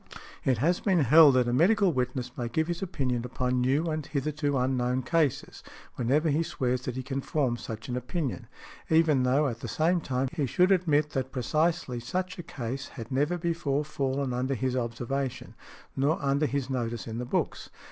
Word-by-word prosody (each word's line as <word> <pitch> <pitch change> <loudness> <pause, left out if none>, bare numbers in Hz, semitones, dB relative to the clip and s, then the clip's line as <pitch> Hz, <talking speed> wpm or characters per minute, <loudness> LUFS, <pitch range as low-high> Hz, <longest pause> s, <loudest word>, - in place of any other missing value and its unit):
It 130 -3 +2
has 170 +9 +2
been 185 -5 +2
held 145 +1 +7
that 125 -1 +3
a 120 - 0
medical 185 - +4
witness 125 -1 -2
may 120 -2 -3
give 160 +7 0
his 175 +1 -3
opinion 130 -10 -1
upon 125 0 -1
new 135 +6 +2
and 155 0 -2
hitherto 145 0 -1
unknown 125 0 0
cases 155 0 0 0.3
whenever 145 +6 +1
he 150 +3 +2
swears 125 -5 -1
that 125 - -3
he 130 - -4
can 135 +1 -3
form 135 -4 0
such 115 -1 -7
an 125 - -3
opinion, 130 +2 -3 0.4
even 160 -4 +4
though 135 +4 +3
at 115 -3 -4
the 120 - -6
same 165 +9 +1
time 130 -2 -1
he 150 -5 -1
should 180 - +3
admit 155 -5 +2
that 130 -1 -2
precisely 155 0 0
such 180 +10 -3
a - - -2
case 130 -5 -5
had 115 -2 -9
never 145 +7 +1
before 165 -4 -1
fallen 135 -3 -2
under 130 +2 -1
his 130 +1 -1
observation, 125 +2 -3 0.4
nor 140 +4 +1
under 140 +2 +1
his 140 -3 -2
notice 120 -5 -3
in 115 +1 -5
the - - -2
books. - - -2
135 Hz, 190 wpm, -28 LUFS, 125-155 Hz, 0.4 s, held